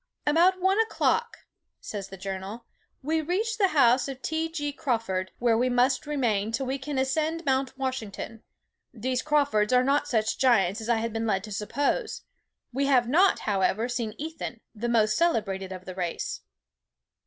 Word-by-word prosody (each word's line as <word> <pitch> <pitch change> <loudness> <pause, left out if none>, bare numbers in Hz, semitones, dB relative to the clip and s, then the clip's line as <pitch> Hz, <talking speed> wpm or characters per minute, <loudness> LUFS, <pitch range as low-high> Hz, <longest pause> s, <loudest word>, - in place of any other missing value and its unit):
"About 345 +5 +4
one 380 +3 +2
o'clock," 460 +1 0 0.3
says 200 -2 -6
the 195 - -9
journal, 195 +4 -6 0.4
"we 315 +3 +1
reached 420 +8 -1
the 390 - +5
house 260 -6 +4
of 270 -2 -6
T. 320 +1 -1
G. 290 -3 -3
Crawford, 225 -11 -2
where 235 -1 +2
we 250 +3 +2
must 250 +2 +2
remain 225 -8 0
till 265 +4 -1
we 265 +2 -2
can 280 +1 -4
ascend 310 +5 0
Mount 265 -1 0
Washington. 230 -4 -4 0.5
These 255 +2 -2
Crawfords 285 -8 +2
are 250 0 +5
not 280 +2 +2
such 220 -4 0
giants 225 -6 +3
as 220 - -6
I 235 - +4
had 225 0 -2
been 225 0 -2
led 195 -3 0
to 215 - -8
suppose. 280 - -1 0.5
We 275 +2 +1
have 250 -4 +4
not, 355 +10 +4
however, 205 +2 +1
seen 235 -3 -3
Ethan, 305 -6 -6
the 235 +2 -3
most 215 -2 +3
celebrated 200 - 0
of 185 -1 -8
the 185 - -6
race. 180 -2 -3
250 Hz, 170 wpm, -27 LUFS, 215-295 Hz, 0.5 s, the